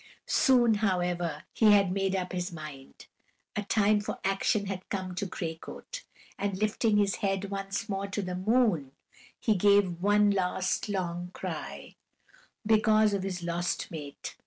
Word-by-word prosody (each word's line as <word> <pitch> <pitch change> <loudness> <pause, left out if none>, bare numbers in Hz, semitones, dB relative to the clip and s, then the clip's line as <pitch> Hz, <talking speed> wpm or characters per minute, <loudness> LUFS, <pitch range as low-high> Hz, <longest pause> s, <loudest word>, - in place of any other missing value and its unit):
Soon, 240 -3 +4
however, 175 -6 -1
he 215 -2 +5
had 200 -3 +4
made 195 0 0
up 185 -1 -2
his 180 0 -3
mind 150 -5 -10 0.5
a 210 - 0
time 210 0 +2
for - - -4
action 195 +2 +1
had 190 -1 -6
come 185 -2 -3
to 190 +2 -3
Gray 170 -3 -4
Coat; - - -9 0.3
and 200 -2 -1
lifting 215 +1 +1
his 200 -1 +2
head 195 0 -1
once 195 +2 -3
more 195 -1 -2
to 200 +1 -3
the 180 -1 -4
moon, 190 - +1 0.5
he 230 -4 +2
gave 200 -3 +3
one 205 +1 +4
last 185 +1 0
long 175 -3 -2
cry, - - -6 0.7
because 215 -1 +4
of 200 - 0
his 185 -2 -4
lost 175 +1 -2
mate. 145 -4 -7
195 Hz, 155 wpm, -29 LUFS, 180-210 Hz, 0.7 s, he